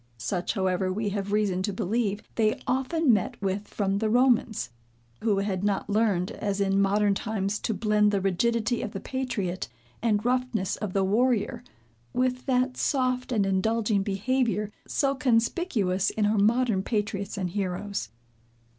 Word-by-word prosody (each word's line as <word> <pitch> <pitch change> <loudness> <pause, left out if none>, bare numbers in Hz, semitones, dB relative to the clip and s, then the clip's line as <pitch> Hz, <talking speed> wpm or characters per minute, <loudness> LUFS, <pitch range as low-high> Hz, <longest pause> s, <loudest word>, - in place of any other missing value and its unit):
Such, 175 - -2
however 190 -2 0
we 210 +2 -1
have 200 0 -3
reason 205 -3 +1
to 205 - -1
believe, 205 +1 -1
they 215 -1 +1
often 265 +2 +2
met 205 -4 -1
with 200 +1 -2
from 195 -1 -1
the 220 0 0
Romans, 240 - +2 0.5
who 215 -3 +2
had 195 -1 -1
not 205 0 0
learned, 205 -3 +1
as 205 -3 -3
in 195 0 +2
modern 200 +1 +3
times 205 -1 -2
to 225 - -1
blend 210 -1 +3
the 200 -1 +1
rigidity 225 +5 +1
of 210 - -5
the 195 - -4
patriot, 230 -9 -3 0.3
and 215 -2 +1
roughness 245 -6 0
of 205 -4 -5
the 195 - +2
warrior, 235 +3 +1 0.5
with 255 +1 0
that 255 0 +1
soft 255 -2 0
and 210 -5 +2
indulging 210 +2 +1
behavior, 210 +1 0 0.2
so 275 -1 +1
conspicuous 230 - +1
in 215 - 0
our 210 0 +2
modern 225 -1 +3
patriots 205 -1 -2
and 185 -3 -2
heroes. 200 +1 -3
210 Hz, 155 wpm, -27 LUFS, 195-235 Hz, 0.5 s, modern